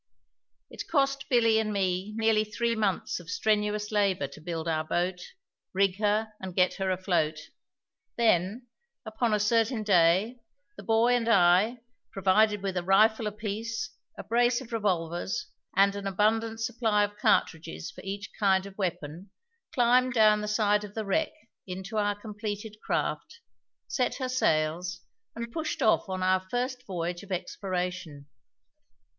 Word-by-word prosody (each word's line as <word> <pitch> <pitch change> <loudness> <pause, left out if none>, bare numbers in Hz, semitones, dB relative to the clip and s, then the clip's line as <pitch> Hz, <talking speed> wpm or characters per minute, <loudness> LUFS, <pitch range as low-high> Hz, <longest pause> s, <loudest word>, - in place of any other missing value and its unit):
It - - -7
cost 275 -3 0
Billy 230 -3 +4
and 215 -1 -1
me 190 0 -1
nearly 220 -1 +3
three 230 +2 -1
months 205 -5 -1
of 170 -1 -13
strenuous 210 0 0
labour 200 -7 +1
to 155 - -13
build 165 0 -4
our 155 -1 0
boat, 180 +3 -1 0.5
rig 190 -1 +2
her, 215 +1 +1
and 185 -2 -7
get 180 -1 +3
her 195 -1 -1
afloat; 175 -5 0 0.8
then, 220 +1 +2 0.4
upon 220 +1 -1
a 210 - +2
certain 225 +2 +1
day, 195 +5 +3 0.4
the - - -10
boy 225 +4 +3
and 235 -1 0
I, 200 +4 +4 0.3
provided 200 +2 +2
with 190 -2 -2
a 175 - -1
rifle 215 +4 +4
apiece, 220 +3 -4 0.3
a - - -6
brace 240 +4 +2
of 260 -3 -11
revolvers, 180 -4 -1 0.3
and 200 +1 +4
an 200 -1 -4
abundant 220 +3 0
supply 225 -3 +1
of 205 0 -3
cartridges 155 - 0
for - - -12
each 200 +1 -6
kind 190 -2 +3
of 200 +1 -12
weapon, 175 0 -4 0.4
climbed 250 0 +3
down 215 -2 +5
the 210 - -4
side 210 -1 +2
of 205 -1 -10
the 220 -1 -3
wreck 310 +11 0 0.4
into 190 +4 -5
our 205 -1 0
completed 210 0 -6
craft, 150 - -2 0.5
set 250 - -1
her 260 -2 -3
sails, 175 -5 0 0.3
and 235 0 -5
pushed 315 -1 -3
off 220 - +3
upon 185 -1 -4
our 185 0 +3
first 250 +2 -3
voyage 175 -1 -3
of 200 - -13
exploration. 180 -5 -4
205 Hz, 150 wpm, -28 LUFS, 185-225 Hz, 0.8 s, down